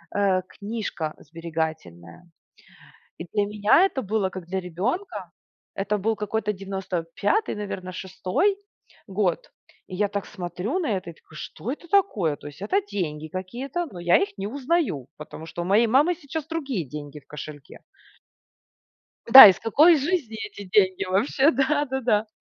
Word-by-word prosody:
э, 195 -2 +2
книжка 200 -8 -5
сберегательная. 160 - -6 0.9
И 170 - -7
для 205 - +2
меня 210 - +4
это 305 -8 -2
было 205 -3 -1
как 185 -2 -8
для 190 +2 -3
ребенка, 190 - -4 0.4
это 205 +2 -1
был 220 +3 0
какой-то 210 0 -2
95, 195 - -2
наверно, 195 -3 -5
6 190 - -1 0.5
год. 190 -3 -1 0.4
И 185 - -7
я 205 +2 +1
так 200 -1 -3
смотрю 180 - -4
на 340 - -2
это 175 -2 -7
и - - -15
такой: 155 - -20
"Что 230 - -6
это 310 +5 -8
такое?" 220 - +2
То - - -11
есть, 145 +4 -12
это 380 - +1
деньги 160 - -4
какие-то, 250 - -4
но 185 -10 -10
я 175 0 +5
их 400 0 -3
не 195 - -3
узнаю, 265 - -1
потому 155 +1 -9
что 165 +1 -6
у - - -3
моей 210 +5 +4
мамы 285 +10 +4
сейчас 315 -1 -6
другие 275 - -3
деньги 145 +1 -8
в 140 - -29
кошельке. 150 -1 -10 1.5
Да, 265 -1 +14
из 190 -3 +5
какой 310 +9 +5
жизни 290 -6 -1
эти 200 0 -10
деньги? 185 -1 +3
Вообще, 235 +10 +2
да-да-да. 265 -5 +1
200 Hz, 155 wpm, -24 LUFS, 175-265 Hz, 1.5 s, Да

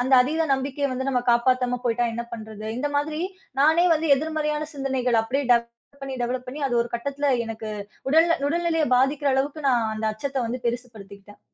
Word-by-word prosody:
அந்த 260 +2 -1
அதீத 315 +5 0
நம்பிக்கைய 275 +1 -2
வந்து 260 +1 -2
நம்ம 250 -2 +1
காப்பாத்தம 250 +1 +2
போய்ட்டா 240 0 +1
என்ன 235 - -3
பண்றது? 220 -1 -7
இந்த 290 +3 -1
மாதிரி, 305 +2 -1 0.4
நானே 320 +4 +5
வந்து 315 +1 -1
எதிர்மறையான 305 0 -2
சிந்தனைகள், 260 -4 0
அப்டியே 270 +5 -1
டெவலப் 235 +4 -3
பண்ணி 270 -1 -4
டெவலப் 250 +1 -2
பண்ணி 285 +4 -6
அது 245 - -1
ஒரு 235 - -7
கட்டத்தில 280 +4 -2 0.2
எனக்கு 220 -1 -6 0.4
உடல்நில 325 +4 +4
உடல்நிலையை 325 -2 +1
பாதிக்கிற 275 +3 +2
அளவுக்கு, 280 +2 -1
நான் 235 -3 +2
அந்த 220 0 -2
அச்சத்தை 275 +4 -3
வந்து 245 +2 -4
பெருசு 245 +1 -2
படுத்திக்கிட்டேன். 200 0 -13
260 Hz, 175 wpm, -24 LUFS, 235-290 Hz, 0.4 s, நானே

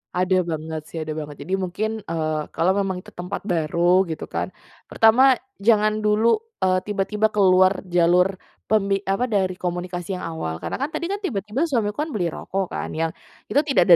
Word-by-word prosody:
Ada 185 +1 +2
banget, 160 -1 -4
sih, 165 - -6
ada 155 - -5
banget. 150 -1 -5
Jadi 185 - -4
mungkin, 190 +4 -2
eee, 155 -5 -2
kalau 175 +3 +3
memang 190 -2 -1
itu - - -14
tempat 180 +3 -6
baru, 175 0 +2
gitu, 160 -2 -5
kan, - - -3 0.4
pertama, 255 +4 +5 0.2
jangan 215 0 +3
dulu, 215 - +3 0.2
eee, 185 0 +3
tiba-tiba 210 +1 +1
keluar 185 -2 +4
jalur 180 +1 +3 0.3
pemi 200 -2 +2
apa, 195 +6 0
dari 190 -4 0
komunikasi 180 +1 -3
yang 180 - -6
awal. 80 - -4
Karena, - - -3
kan, 280 +3 -1
tadi, 340 +3 -2
kan, 400 - -2
tiba-tiba 255 - -2
suamiku, 240 +1 -1
kan, - - -8
beli 175 -5 0
rokok, 195 +2 -3
kan, - - -3
yang 165 0 0 0.4
itu 285 - +4
tidak 275 - +4
ada - - +12
190 Hz, 180 wpm, -23 LUFS, 175-215 Hz, 0.4 s, ada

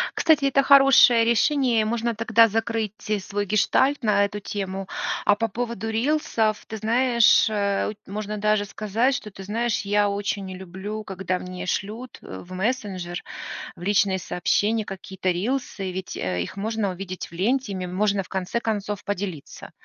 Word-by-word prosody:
Кстати, 310 -4 +3
это 275 0 +3
хорошее 270 -4 +7
решение, 235 0 +3
и - - +1
можно 230 +1 -1
тогда 230 +1 +5
закрыть 225 -1 -1 0.3
свой 205 +1 -3
гештальт 250 +7 +2
на 205 -2 +3
эту 205 +1 -5
тему. 195 -1 -4 0.4
А 205 - +5
по 225 +2 -1
поводу 230 -1 -4
рилсов, 225 -3 0
ты 220 - -6
знаешь, 235 +2 +4
э 200 -2 0
у - - -4
ть - - -26
можно 210 +1 -4
даже 210 0 +1
сказать, 215 +6 0
что 210 - -5
ты 195 - -10
знаешь, 230 +3 -1
я 205 0 +2
очень 200 0 -2
не 185 -1 -7
люблю, 190 +4 -6
когда 190 -2 -3
мне 180 0 -7
шлют, 220 +7 -4
э, 95 - -8
в 185 - -11
мессенджер, 190 -4 -3 0.5
в - - -12
личные 195 0 +2
сообщения 210 +5 0
какие-то 190 -1 -4
рилсы, 200 0 -2
ведь, 185 0 -6
э, 90 -1 -2
их 140 - -7
можно 215 -1 -1
увидеть 185 0 -6
в - - -25
ленте, 225 +6 0
ими 185 -1 -4
можно, 200 +2 0
в 185 - -16
конце 190 +4 -2
концов, 210 -3 -3
поделиться. 195 -7 -5
210 Hz, 170 wpm, -24 LUFS, 190-230 Hz, 0.5 s, хорошее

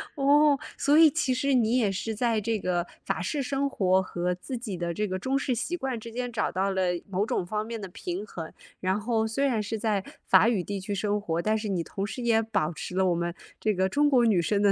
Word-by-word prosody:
哦， 290 0 +4 0.2
所 285 +2 +3
以 320 -2 +9
其 270 -4 0
实 270 +1 +1
你 235 0 +3
也 215 -6 +2
是 220 +4 -3
在 230 0 +1
这 220 0 -1
个 175 -2 -1 0.2
法 - - -2
式 235 - -2
生 275 +2 0
活 190 -8 +2
和 180 -1 -2
自 255 +8 -6
己 225 -6 -5
的 170 0 -2
这 210 +5 -1
个 185 -1 -2
中 260 +8 0
式 265 -2 -1
习 245 +9 -2
惯 265 -8 -3
之 230 +1 -9
间 245 +1 -3
找 220 - -1
到 190 +1 0
了 190 -1 0 0.3
某 195 +2 0
种 240 -5 -1
方 210 +3 -2
面 230 -1 -5
的 195 - -5
平 180 +2 -5
衡。 165 -5 -7 0.3
然 190 +3 0
后 220 0 0
虽 225 +5 -1
然 245 -6 +2
是 220 +1 -4
在 210 -3 0 0.2
法 190 +4 +6
语 215 -6 +1
地 200 +2 -4
区 195 +2 -4
生 205 +1 0
活， 170 -4 -2
但 215 +4 +1
是 215 0 -4
你 185 -4 -1
同 195 +3 -4
时 245 +4 -6
也 225 -1 +3
保 200 -8 0
持 180 - -7
了 190 - +3
我 175 - +2
们 170 0 -2 0.3
这 215 -1 +1
个 190 0 +1
中 290 +7 +3
国 255 -4 +4
女 210 -6 +4
生 200 +5 +1
的， 200 -1 +5
215 Hz, 275 characters per minute, -27 LUFS, 190-245 Hz, 0.3 s, 以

